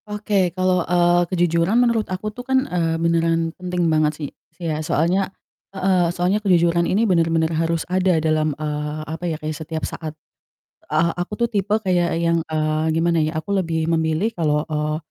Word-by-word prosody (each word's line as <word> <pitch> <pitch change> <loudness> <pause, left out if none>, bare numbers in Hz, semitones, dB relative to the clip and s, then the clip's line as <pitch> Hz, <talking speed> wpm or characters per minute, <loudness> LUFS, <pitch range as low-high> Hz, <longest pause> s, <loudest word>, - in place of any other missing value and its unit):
Oke. 205 -3 0
Kalau, 185 -1 +2
eee, 175 0 +3
kejujuran 175 +3 +2
menurut 235 -3 +2
aku 200 +3 -4
tuh 245 - -7
kan, 260 +1 +1
eee, 165 -5 -1
beneran 165 0 +1
penting 180 -1 -2
banget 155 -2 +3
sih 145 -3 -5 0.3
sih 170 - -7
ya, 155 - -3
soalnya 170 +5 +1 0.4
heeh, 185 -3 +1
soalnya 180 +4 0
kejujuran 170 -3 +3
ini 220 +4 +2
benar-benar 165 -3 +2
harus 165 0 -1
ada 185 -1 +2
dalam, 155 -1 +1
eee, 150 0 -3
apa 160 +3 -6
ya, 160 - -2
kayak 155 0 -4
setiap 160 +1 -5
saat. 155 -2 -6 0.8
Eee, 160 +2 +2
aku 195 +4 -4
tuh 235 - +2
tipe 205 -1 +1
kayak 180 -6 0
yang, 170 0 +1
eee, 155 0 0
gimana 165 0 +2
ya, 155 +1 -1
aku 160 +6 -3
lebih 165 -4 0
memilih 160 +7 0
kalau, 150 -2 0
eee, 150 -1 -2
170 Hz, 175 wpm, -21 LUFS, 160-185 Hz, 0.8 s, eee